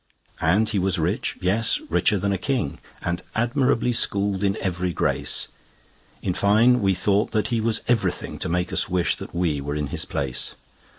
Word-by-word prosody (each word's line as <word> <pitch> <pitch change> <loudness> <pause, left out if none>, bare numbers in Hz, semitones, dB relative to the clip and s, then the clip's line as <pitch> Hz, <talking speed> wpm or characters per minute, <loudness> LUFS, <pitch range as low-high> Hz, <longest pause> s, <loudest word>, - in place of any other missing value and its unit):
And 100 +7 +3
he 105 -2 0
was 95 0 0
rich, 90 +6 -1
yes, 105 - +2
richer 105 - +2
than 100 +1 0
a - - 0
king, 135 -3 -2 0.2
And 85 +1 -2
admirably 125 +1 +1
schooled 100 -3 +2
in 100 -1 +1
every 90 -1 -2
grace: - - 0 0.8
In 90 - 0
fine, 110 +6 +4
we 95 -1 +2
thought 100 +4 +1
that 110 -1 0
he 115 -2 0
was 115 0 0
everything 120 -3 -1
To - - -1
make 90 +1 -1
us - - +1
wish 90 -1 +1
that - - -9
we 80 -5 0
were 70 +1 -4
in 75 -2 -2
his - - 0
place. 65 -3 -1
100 Hz, 180 wpm, -23 LUFS, 90-110 Hz, 0.8 s, fine